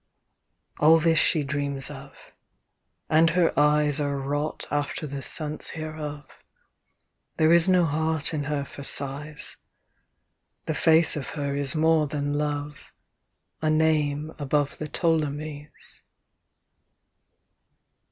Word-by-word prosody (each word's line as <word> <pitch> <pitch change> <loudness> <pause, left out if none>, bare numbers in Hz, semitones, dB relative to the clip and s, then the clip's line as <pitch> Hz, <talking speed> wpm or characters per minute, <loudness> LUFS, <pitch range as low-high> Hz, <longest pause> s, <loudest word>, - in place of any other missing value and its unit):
XV - - -17
All 160 +2 +7
this 165 0 +3
she 155 - +2
dreams 140 0 -2
of, 140 0 -11 0.9
and 160 +2 +4
her 170 0 +2
eyes 150 0 +3
Are 140 -1 -1
wrought 145 +3 -3
after 145 +1 -2
the 140 -1 -6
sense 155 +2 -1
hereof. 155 -2 -7 0.9
There 160 +1 +4
is 170 +2 +5
no 180 -2 +4
heart 160 +1 -1
in 145 -2 -2
her 145 -1 -2
for 140 - -11
sighs; 145 +2 -3 1.1
The - - -1
face 160 0 +4
of 145 -3 -5
her 140 -1 -2
is 140 +1 -1
more 160 -1 +3
than 145 0 -2
love 145 0 -4 0.7
A 155 - +1
name 155 -1 +1
above 145 0 -1
the 155 - -4
Ptolemies. 150 -2 -2
150 Hz, 120 wpm, -25 LUFS, 145-155 Hz, 1.1 s, All